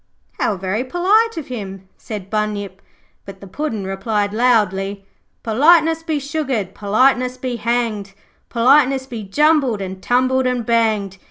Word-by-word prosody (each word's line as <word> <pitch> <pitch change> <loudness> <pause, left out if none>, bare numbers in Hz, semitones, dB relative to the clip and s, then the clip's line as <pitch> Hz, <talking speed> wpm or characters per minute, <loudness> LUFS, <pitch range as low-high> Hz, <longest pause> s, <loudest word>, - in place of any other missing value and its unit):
'How 205 - 0
very 190 +6 -2
polite 400 - +2
of 315 - -4
him,' 195 -5 -7
said 205 -3 -8
Bunyip, 205 -3 -3 0.4
but 195 -1 -11
the 200 - -11
Puddin' 220 -1 -4
replied 205 +1 -2
loudly 200 -4 +1 0.4
'Politeness 320 +7 +4
be 320 -2 -2
sugared, 270 - -3
politeness 250 +4 +1
be 250 -1 -4
hanged, 230 -4 -2 0.4
Politeness 265 +2 +3
be 235 -4 -7
jumbled 275 +2 +2
and 190 -1 -6
tumbled 255 +2 +1
and 250 -2 -1
banged. 215 -5 0
230 Hz, 135 wpm, -19 LUFS, 200-265 Hz, 0.4 s, Politeness